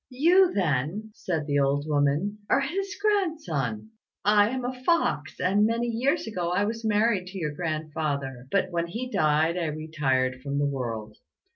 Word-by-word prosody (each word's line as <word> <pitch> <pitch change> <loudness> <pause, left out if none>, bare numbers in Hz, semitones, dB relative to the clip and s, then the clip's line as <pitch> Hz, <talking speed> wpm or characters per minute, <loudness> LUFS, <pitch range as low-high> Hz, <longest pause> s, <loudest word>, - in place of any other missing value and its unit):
"You, 345 +8 +4
then," 180 +5 -1
said 165 -8 -3
the 145 -1 +1
old 140 +1 +1
woman, 150 +8 +1
"are 275 - +4
his 390 +8 -3
grandson. 310 - -1 0.3
I 205 0 +5
am 255 0 -3
a 255 0 -5
fox, 330 - +1
and 205 +3 +3
many 230 +1 0
years 255 +7 0
ago 180 -6 -2
I 180 +3 +1
was 225 +2 -4
married 210 -3 +2
to 190 +1 -8
your 155 -5 -2
grandfather; 150 -5 -3
but 185 +1 +1
when 170 0 -1
he 245 +8 -5
died 155 +1 +2
I 170 - -1
retired 140 -5 -1
from 140 +1 -3
the 145 - +2
world. 115 -6 -4
175 Hz, 165 wpm, -26 LUFS, 145-230 Hz, 0.3 s, I